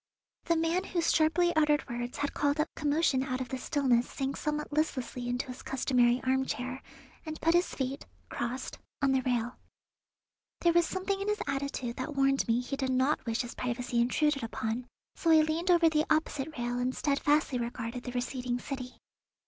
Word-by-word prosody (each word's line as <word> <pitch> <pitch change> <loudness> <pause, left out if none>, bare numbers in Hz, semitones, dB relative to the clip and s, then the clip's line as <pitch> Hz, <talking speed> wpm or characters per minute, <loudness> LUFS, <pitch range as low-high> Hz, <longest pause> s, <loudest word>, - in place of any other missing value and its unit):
The 335 - +2
man 330 +3 +1
whose 340 -3 +1
sharply 340 +2 +3
uttered 300 -1 +3
words 240 +1 -4
had 285 -1 -2
called 290 +1 +1
up 305 - 0
commotion 295 -2 +2
out 260 -1 -2
of 255 -2 -4
the 260 - -3
stillness 250 -4 +2
sank 270 0 -3
somewhat 300 0 -3
listlessly 255 -5 -1
into 245 +2 -1
his 255 -1 -8
customary 250 -2 +2
armchair, 260 0 -1 0.4
and 315 -1 -6
put 330 - +3
his 350 +1 +2
feet, 265 +1 -3 0.2
crossed, 245 +2 -4 0.2
on 275 - +4
the 265 -1 +3
rail. 245 -1 -1 1.0
There 340 -1 +4
was 345 -1 +4
something 390 +1 -2
in 400 - -3
his 420 0 0
attitude 270 -3 -3
that 280 +3 -4
warned 275 0 +2
me 230 +1 +2
he 250 +3 -4
did 265 -1 -2
not 260 +3 +2
wish 225 0 0
his 240 - -6
privacy 245 -1 -1
intruded 280 +4 +2
upon, 225 +1 -3 0.3
so 335 - -1
I 320 -1 +7
leaned 315 +4 -1
over 340 -2 +6
the 310 -1 +2
opposite 310 -1 0
rail 240 0 -1
and 255 +1 -1
steadfastly 290 -2 +1
regarded 235 0 -4
the 250 - -4
receding 250 0 -2
city. 255 -1 -6
270 Hz, 180 wpm, -30 LUFS, 250-310 Hz, 1.0 s, I